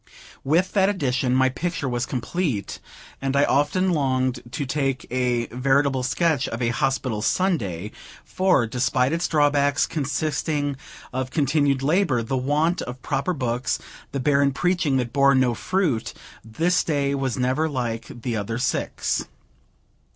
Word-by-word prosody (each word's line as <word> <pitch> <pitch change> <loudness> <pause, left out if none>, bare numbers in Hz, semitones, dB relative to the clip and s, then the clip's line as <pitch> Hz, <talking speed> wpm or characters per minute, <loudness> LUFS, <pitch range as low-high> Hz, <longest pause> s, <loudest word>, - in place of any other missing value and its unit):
With 170 +7 +2
that 195 -1 +4
addition, 130 -9 0
my 130 0 +4
picture 165 +1 -3
was 120 0 -1
complete; 130 - -2 0.4
and 135 0 -1
I 140 - +4
often 150 +8 +2
longed 130 -5 +1
to 135 +3 -3
take 135 -1 -1
a 125 -2 +1
veritable 135 +1 +2
sketch 140 +2 +1
of 115 - -4
a 120 -2 +1
Hospital 130 -3 -1
Sunday, 105 - 0 0.3
for, 185 -10 +2
despite 125 +3 +1
its 170 +1 0
drawbacks, 145 -1 +2
consisting 145 0 -1 0.4
of 130 0 -2
continued 140 -2 +1
labor, 145 -6 +2
the 125 +4 -2
want 150 +7 +1
of 125 0 -7
proper 140 +7 -1
books, 125 -4 -1 0.3
the 140 - -2
barren 140 0 +2
preaching 175 -3 +1
that 120 -2 -2
bore 140 0 +5
no 130 -2 +3
fruit, 165 - -1 0.3
this 165 +12 +1
day 140 -3 0
was 135 -3 -1
never 130 +5 +1
like 120 -5 -3 0.2
the 120 -2 -1
other 110 +2 -3
six. 125 +1 -1
135 Hz, 145 wpm, -23 LUFS, 125-150 Hz, 0.4 s, bore